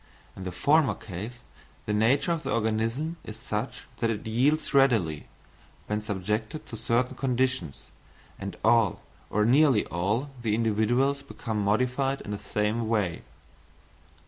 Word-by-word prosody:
In 95 - -7
the 90 - -3
former 150 - +3
case 110 +5 -7 0.4
the 105 - -1
nature 120 +10 +3
of 165 -2 0
the - - -4
organism 115 +9 0
is 110 - -8
such 105 +4 -4
that 115 - 0
it 105 -2 -3
yields 130 +10 +1
readily, 115 - +3 0.6
when 105 0 -1
subjected 105 +6 -3
to - - -8
certain 120 +3 0
conditions, 130 - -1 0.5
and 100 0 -6
all, 115 -3 +4 0.3
or 105 0 +2
nearly 130 -2 +5
all, 105 - -1
the 110 -3 +1
individuals 115 +5 +2
become 110 -6 -4
modified 125 +6 +1
in 105 - -7
the 100 - -3
same 105 +2 -1
way. 100 -7 0
115 Hz, 140 wpm, -27 LUFS, 105-130 Hz, 0.6 s, nearly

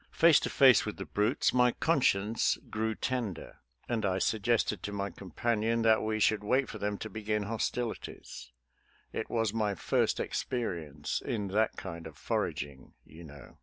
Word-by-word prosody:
Face 165 -2 +5
to - - -3
face 130 -4 +6
with 105 - -5
the 95 - -5
brutes, 105 +7 +1
my 125 -1 +4
conscience 115 -9 +2
grew 110 0 -1
ten 120 -7 -2
der, - - -12 0.3
and 115 -3 -1
I 95 -2 +1
suggested 110 -1 +1
to 100 - -5
my 100 -1 -3
companion 115 +6 -1
that 110 -1 +5
we 110 0 -1
should 105 0 +2
wait 130 +5 +2
for - - -7
them 105 0 -2
to 110 - -6
begin 105 -1 -2
hostilities 110 - -4 0.3
— - - -36
it - - -3
was 115 -3 0
my 105 -3 0
first - - +1
experience 80 - -3
in 105 -7 -2
that 110 +3 +1
kind 85 -3 -7
of 80 - -13
foraging, 70 -2 -3
you 80 +3 -13
know. 75 -4 -13
105 Hz, 170 wpm, -30 LUFS, 95-115 Hz, 0.3 s, face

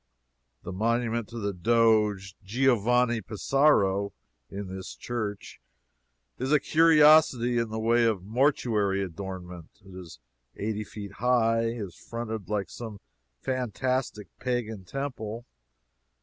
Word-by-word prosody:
The - - -6
monument 115 +2 0
to 120 - -9
the 100 -3 -2
doge 105 -1 +2
Giovanni 120 +1 +2
Pesaro, 100 -2 +2 0.4
in 100 +1 -6
this 95 0 -7
church, 110 -4 -5 0.8
is 130 +3 -2
a 150 - +5
curiosity 150 -6 +5
in 115 -1 -1
the 110 - -4
way 115 +1 +3
of 105 -5 0
mortuary 110 -4 +1
adornment. 90 -2 -8
It 95 - -13
is 90 -3 -10 0.4
eighty 105 0 -3
feet 105 -1 -9
high 115 -1 +2
and 115 -1 -3
is 85 - -20
fronted 110 -5 -6
like 105 -2 -2
some 110 -4 -8 0.4
fantastic 130 -3 -2
pagan 110 -6 -3
temple. 120 -3 -5
110 Hz, 120 wpm, -27 LUFS, 100-120 Hz, 0.8 s, a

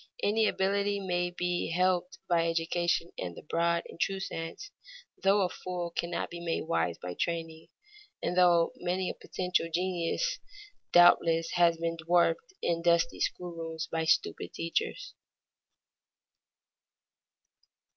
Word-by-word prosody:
Any 215 +1 +3
ability 200 +1 +1
may 175 -2 -1
be 180 0 -2
helped 180 +1 +1
by 170 -2 +2
education 170 +1 0
in 90 -2 -5
the - - -11
broad 170 +2 +1
and - - -13
true 195 0 0
sense, 165 - -6 0.5
though 195 +1 +4
a 185 - +1
fool 180 -1 -5
cannot 170 0 -3
be 170 - -6
made 165 -1 -1
wise 85 - 0
by 90 0 -6
training, 165 - -3 0.5
and 175 - -2
though 175 -2 +5
many 180 +1 -1
a - - -8
potential 180 -2 -2
genius 185 - -1 0.5
doubtless 165 -1 +5
has 170 -2 +4
been 165 0 -2
dwarfed 175 - +2
in 170 -1 +1
dusty 170 0 +2
school 180 -1 -2
rooms 165 -1 -5
by 165 0 -1
stupid - - +1
teachers. 335 - -2
175 Hz, 130 wpm, -30 LUFS, 165-180 Hz, 0.5 s, though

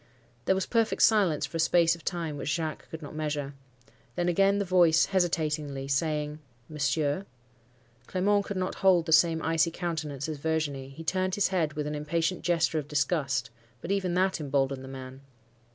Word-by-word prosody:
"There 190 - +3
was 190 - -1
perfect 230 -2 +1
silence 195 -9 +3
for 165 - -6
a - - -5
space 165 +1 +4
of 170 -1 -9
time 170 -4 -3
which 145 - -4
Jacques 155 -1 -3
could 160 0 -8
not 145 - -8
measure. 150 -2 -3 0.6
Then 175 - 0
again 195 +3 +3
the 200 - 0
voice, 175 -3 +4
hesitatingly, 155 -7 -1
saying, 150 +1 -1 0.3
'Monsieur!' 150 +4 -1 0.8
Clement 200 +2 +1
could 200 - -4
not 185 0 -1
hold 185 -4 +4
the 160 - -3
same 160 +1 +4
icy 165 0 +2
countenance 160 -5 -4
as 155 -2 -5
Virginie; 145 -3 -2
he 135 +4 -10
turned 185 +2 0
his 205 - +2
head 165 -5 0
with 150 -1 -3
an 150 - -3
impatient 165 +4 -1
gesture 165 -2 +1
of 145 - -7
disgust; 140 -4 0 0.3
but 185 - -5
even 185 -3 0
that 185 0 +1
emboldened 135 -2 -1
the - - -9
man. 130 0 -9
160 Hz, 180 wpm, -28 LUFS, 145-180 Hz, 0.8 s, space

